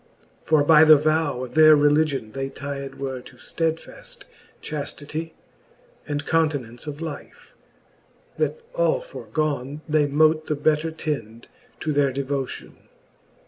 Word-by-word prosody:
For 155 -2 +4
by 155 +1 +7
the 155 -1 +9
vow 155 -3 0
of 125 - -8
their 155 0 +8
religion 145 -5 +2
They 135 +2 -4
tied 140 0 -6
were 135 -2 -5
to 125 - -15
ftedfaft 165 - -4 0.4
chaftity, 155 +2 -5 0.7
And 145 -1 -3
continence 145 -7 -1
of 150 +1 -6
life, 160 -3 -8 0.8
that 475 - -1
all - - +2
forgon, 155 - -4
They 150 -1 +2
mote 155 +2 +3
the 150 - 0
better 155 +2 +1
tend 120 -8 -5 0.3
to 155 - -1
their 140 -1 +2
devotion. 135 0 -4
150 Hz, 125 wpm, -23 LUFS, 140-155 Hz, 0.8 s, the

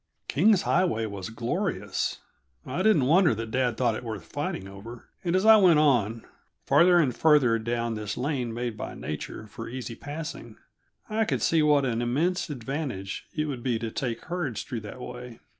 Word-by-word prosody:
King's 195 +7 +4
Highway 170 -12 +1
was 100 -3 -6
glorious; 145 - -2 0.4
I 140 +8 -3
didn't 185 -10 +4
wonder 165 - +4
that 115 0 -5
dad 125 -2 0
thought 120 -2 +2
it 110 - -5
worth 110 -7 -6
fighting 95 +3 -4
over, 110 +5 -10 0.2
and 175 0 0
as 185 +2 +2
I 220 0 +9
went 180 -6 +6
on, 120 -7 +2 0.4
farther 175 +1 +5
and 135 -8 +2
farther 140 -8 +4
down 115 +1 -2
this 105 -1 -4
lane 125 -3 -1
made 120 0 -3
by - - -6
nature 75 +8 -6
for 115 +2 -8
easy 125 -1 -5
passing, 150 +6 -7 0.5
I 220 +1 0
could - - -1
see 165 -1 +3
what 150 -2 +4
an 120 -2 -1
immense 165 +10 0
advantage 130 -7 -4
it 155 0 0
would 135 -5 -4
be 120 -2 0
to 110 0 -4
take 120 -2 -3
herds 170 -10 -3
through 120 -5 -5
that 105 +4 -9
way. 125 -1 -8
125 Hz, 180 wpm, -27 LUFS, 115-160 Hz, 0.5 s, I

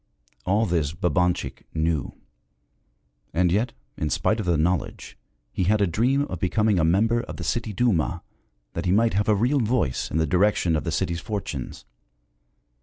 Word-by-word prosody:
All 105 +4 +3
this 80 -6 0
Babanchik 90 -5 0
knew. 80 -3 -1 1.2
And 90 0 +3
yet, 110 +7 +1 0.3
in 75 - -1
spite 110 +8 +1
of 105 - -3
the 85 -3 +3
knowledge, 85 +3 -1 0.4
he 90 - -1
had 105 +3 +3
a 100 - +4
dream 125 - +1
of 90 - -5
becoming 105 +2 +2
a - - +2
member 110 +8 +3
of 120 - -8
the - - -6
city 115 -2 -2
Duma, 90 -6 0 0.5
that 85 - -4
he - - +2
might 115 +4 +3
have 105 +3 +1
a 105 - +5
real 125 +8 +2
voice 115 - 0
in - - -2
the 80 - +2
direction 90 0 +2
of 75 - -2
the - - -1
city's 85 0 -1
fortunes. 80 - -5
90 Hz, 175 wpm, -24 LUFS, 85-110 Hz, 1.2 s, a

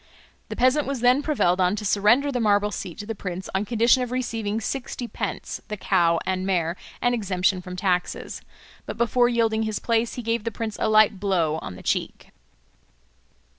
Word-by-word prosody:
The - - -4
peasant 260 +4 +2
was 275 -3 -3
then 250 +3 +4
prevailed 190 - +1
on 180 +2 +2
to 210 0 -5
surrender 225 +9 +3
the 250 - -1
marble 210 -2 +2
seat 180 -3 -6
to 205 - -6
the 225 - -4
prince 185 -3 -6
on 190 +2 0
condition 235 +3 +3
of 250 - -2
receiving 225 -4 -2
sixty 245 +1 -4
pence, - - -5
the 210 - -5
cow 170 -4 +2
and 185 0 -1
mare, 175 -3 0 0.3
and 245 0 +3
exemption 190 -4 0
from 180 0 -8
taxes. 180 -1 -2 0.5
But - - -5
before 240 +1 +3
yielding 225 -2 +1
his 215 -2 -1
place 230 0 0
he 245 - -5
gave 230 -1 -1
the 230 - -1
prince 225 -1 -5
a - - +1
light 215 -2 +4
blow 170 -6 0
on 90 - -7
the - - -12
cheek. - - -2
215 Hz, 190 wpm, -24 LUFS, 185-240 Hz, 0.5 s, then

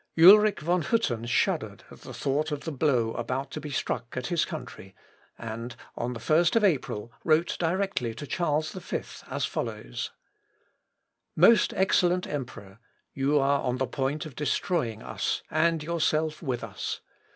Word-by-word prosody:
Ulric 205 +3 +8
von 175 +3 +1
Hütten 120 - 0
shuddered 120 - 0
at - - -13
the - - -9
thought 150 +3 -1
of 145 -1 -3
the 160 - -4
blow 125 -6 +1
about 130 +4 -3
to 155 - -5
be 150 - -6
struck 125 -2 -3
at 125 - -2
his 170 -2 +2
country, 110 -9 -8 0.4
and, 115 +1 -6 0.2
on 120 +1 -2
the 120 - -6
1st 170 +5 +3
of 225 - +4
April 125 - 0
wrote 160 +1 +2
directly 170 - -1
to 145 - -6
Charles 155 0 0
V 185 -2 -4 0.3
as - - -1
follows: - - -4 1.3
"Most 230 -4 +6
excellent 180 -1 +2
emperor, 115 -8 -6 0.3
you 140 +2 +2
are 140 0 +3
on 125 -1 -1
the 130 - 0
point 140 +4 -2
of 150 -5 -9
destroying 150 - -1
us, - - -2
and 160 0 +2
yourself 155 -1 0
with 125 -6 -3
us. 105 -4 -5
150 Hz, 155 wpm, -27 LUFS, 125-170 Hz, 1.3 s, Ulric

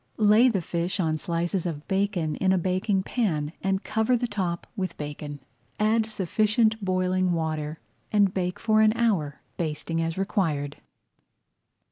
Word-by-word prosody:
Lay 215 +4 +6
the 195 -7 -1
fish 175 +4 -2
on 160 -3 +1
slices 175 +3 -1
of 150 -3 -5
bacon 190 -6 0
in 190 -1 +2
a 190 - +3
baking 185 +2 0
pan 165 -11 -1
and 195 +1 0
cover 220 +3 +1
the 245 - -1
top 185 -6 -2
with 185 -5 -3
bacon. 145 0 -6 0.4
Add 220 +1 +2
sufficient 215 +2 +1
boiling 185 -1 +1
water 155 -1 -2 0.3
and 205 -3 +3
bake 180 -1 -1
for 215 -1 +3
an 215 0 +5
hour, 185 -12 0 0.2
basting 165 0 -2
as 165 +1 -2
required. 160 -8 -1
185 Hz, 145 wpm, -26 LUFS, 165-210 Hz, 0.4 s, Lay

